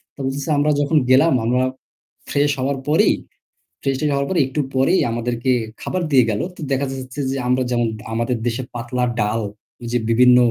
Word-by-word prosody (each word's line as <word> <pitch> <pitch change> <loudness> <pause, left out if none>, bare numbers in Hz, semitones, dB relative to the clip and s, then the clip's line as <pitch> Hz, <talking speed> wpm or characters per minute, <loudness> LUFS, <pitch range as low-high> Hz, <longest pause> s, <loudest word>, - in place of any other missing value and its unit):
তো - - -20
বলতেছে, 135 +3 -3
"আমরা 150 +1 +3
যখন 145 +2 +2
গেলাম 135 +6 +5
আমরা 125 +2 +2 0.7
ফ্রেশ 145 +1 +2
হওয়ার 135 +2 0
পরেই, 150 +2 +4 0.7
ফ্রেশ 135 -1 0
ট্রেশ 150 -1 0
হওয়ার 140 0 0
পরে 180 -3 +1
একটু 135 +3 -4 0.2
পরেই 135 +8 +3
আমাদেরকে 120 +2 -1 0.3
খাবার 185 - -2
দিয়ে 130 -3 +6
গেল। 105 -1 -1
তো - - -12
দেখা 135 +1 +1
যাচ্ছে 130 +1 -7
যে, 135 - -2
আমরা 125 +1 +2
যেমন 120 -1 +1 0.3
আমাদের 115 +2 0
দেশে 120 +2 -1
পাতলা 120 +1 -2 0.2
ডাল, 105 +2 0 0.4
ওই 120 - -6
যে 120 - +3
বিভিন্ন 125 +2 +6
130 Hz, 185 wpm, -20 LUFS, 120-140 Hz, 0.7 s, দিয়ে